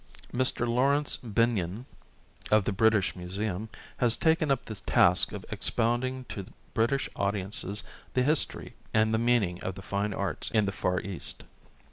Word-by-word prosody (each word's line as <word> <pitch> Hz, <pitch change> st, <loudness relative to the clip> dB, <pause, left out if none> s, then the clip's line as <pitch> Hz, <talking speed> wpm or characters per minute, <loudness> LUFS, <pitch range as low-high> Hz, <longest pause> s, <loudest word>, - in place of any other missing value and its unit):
Mr. 125 Hz, -1 st, +2 dB
Laurence 140 Hz, +5 st, +2 dB
Binyon, 115 Hz, -2 st, 0 dB, 0.6 s
of 105 Hz, -1 st, +4 dB
the -, -, 0 dB
British 105 Hz, -1 st, +2 dB
Museum, 95 Hz, +3 st, -4 dB, 0.3 s
has 120 Hz, -2 st, +5 dB
taken 160 Hz, +1 st, +2 dB
up 135 Hz, -2 st, +1 dB
the 110 Hz, -, -6 dB
task 105 Hz, -, +3 dB
of -, -, -7 dB
expounding 125 Hz, +3 st, 0 dB
to 100 Hz, -6 st, -7 dB, 0.3 s
British 120 Hz, +4 st, +1 dB
audiences 100 Hz, +1 st, -2 dB, 0.3 s
the 125 Hz, -, +3 dB
history 150 Hz, +3 st, +1 dB, 0.2 s
and 110 Hz, 0 st, +3 dB
the 110 Hz, -, +2 dB
meaning 115 Hz, -7 st, +1 dB
of 95 Hz, -, -3 dB
the 95 Hz, -, -9 dB
Fine 100 Hz, +1 st, -2 dB
Arts 100 Hz, -6 st, -2 dB
in 110 Hz, -2 st, +2 dB
the 100 Hz, -, -1 dB
Far 90 Hz, -2 st, -1 dB
East. 95 Hz, -3 st, -5 dB
110 Hz, 150 wpm, -29 LUFS, 100-120 Hz, 0.6 s, has